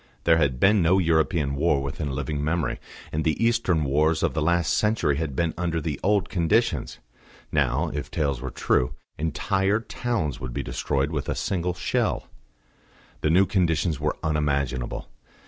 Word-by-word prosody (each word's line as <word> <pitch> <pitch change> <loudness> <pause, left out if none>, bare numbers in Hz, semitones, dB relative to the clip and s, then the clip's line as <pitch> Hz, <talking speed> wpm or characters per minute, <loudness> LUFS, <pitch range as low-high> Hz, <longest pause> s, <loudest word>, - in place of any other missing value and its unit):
There 80 -1 +5
had 65 -5 +1
been 100 +3 +5
no 85 +3 +4
European 80 -4 +2
war 70 -1 +1
within 70 +2 -4
living 70 +2 -3
memory, 80 +1 -1 0.3
and 80 +1 -1
the 80 0 +1
Eastern 115 -9 +2
wars 75 +3 +2
of - - +1
the 80 - -1
last 85 +1 +2
century 105 -10 +1
had 75 -4 -3
been 85 +1 0
under 85 -2 0
the 75 -3 -3
old 100 -1 +2
conditions. 85 -3 0 0.5
Now, 70 +7 +1
if 75 0 -4
tales 70 -6 -1
were 65 - -4
true, 65 0 0 0.2
entire 95 +6 +1
towns 115 - -2
would 65 -2 -6
be - - -2
destroyed 70 +4 -1
with 75 -3 -3
a - - 0
single 90 -1 -1
shell. - - -1 0.9
The 75 - 0
new 90 +4 +5
conditions 85 -4 +1
were - - -1
unimaginable. 70 -5 -1
80 Hz, 165 wpm, -25 LUFS, 70-85 Hz, 0.9 s, There